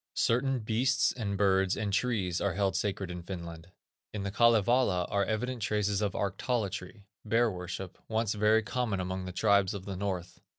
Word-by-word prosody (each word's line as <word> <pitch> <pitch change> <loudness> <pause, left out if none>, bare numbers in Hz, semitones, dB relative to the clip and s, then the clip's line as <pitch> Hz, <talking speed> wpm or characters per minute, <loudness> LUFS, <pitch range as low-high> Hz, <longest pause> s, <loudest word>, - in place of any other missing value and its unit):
Certain 130 +3 +2
beasts, 125 +5 +1
and 100 -5 -3
birds, 95 -1 +2
and 100 -1 -2
trees, 100 -6 0
are 100 -4 0
held 100 -1 +1
sacred 95 -3 -2
in 90 0 -6
Finland. 85 -2 -7 0.4
In 105 -2 -4
the 100 - -3
Kalevala 115 -3 +3
are 100 0 +2
evident 120 +3 -2
traces 105 -1 0
of 100 -2 0
arctolatry, 100 -1 -2 0.2
bear 115 +1 +2
worship, 90 0 -6
once 110 -1 0
very 110 +1 +3
common 120 -4 -1
among 95 0 -3
the 90 - -5
tribes 100 +1 +2
of 95 -1 -7
the 100 - -5
north. 95 -2 -4
100 Hz, 170 wpm, -30 LUFS, 95-110 Hz, 0.4 s, Kalevala